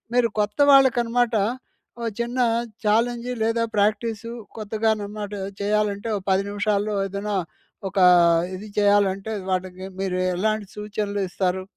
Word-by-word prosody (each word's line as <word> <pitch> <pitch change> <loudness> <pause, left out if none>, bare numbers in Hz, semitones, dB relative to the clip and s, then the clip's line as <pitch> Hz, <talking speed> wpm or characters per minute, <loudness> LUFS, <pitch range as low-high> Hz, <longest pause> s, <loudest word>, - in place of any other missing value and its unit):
మీరు 245 -2 +4
కొత్త 210 +6 -3
వాళ్ళకి 265 -3 +6
అనమాట. 235 0 +1 0.7
ఓ - - -4 0.2
చిన్న 240 +2 -2 0.5
ఛాలెంజు 235 +3 +1
లేదా 230 +1 +1
ప్రాక్టీసు 215 +2 0 0.3
కొత్తగా 220 +1 -1
అనమాట 205 0 -6 0.3
చేయాలంటే, 210 +1 0
ఒక 190 - -8
10 190 +1 +2
నిమిషాల్లో 205 0 0
ఏదన్నా, 200 +1 -3 0.5
ఒకా 190 -1 +3 0.5
ఇది 200 +3 -8
చేయాలంటే, 200 0 +2 0.2
వాటికి 185 0 -3 0.2
మీరు 190 -2 -1 0.2
ఎలాంటి 215 +2 -1
సూచనలు 210 -1 -3
ఇస్తారు? 185 0 -1
210 Hz, 120 wpm, -23 LUFS, 200-225 Hz, 0.7 s, వాళ్ళకి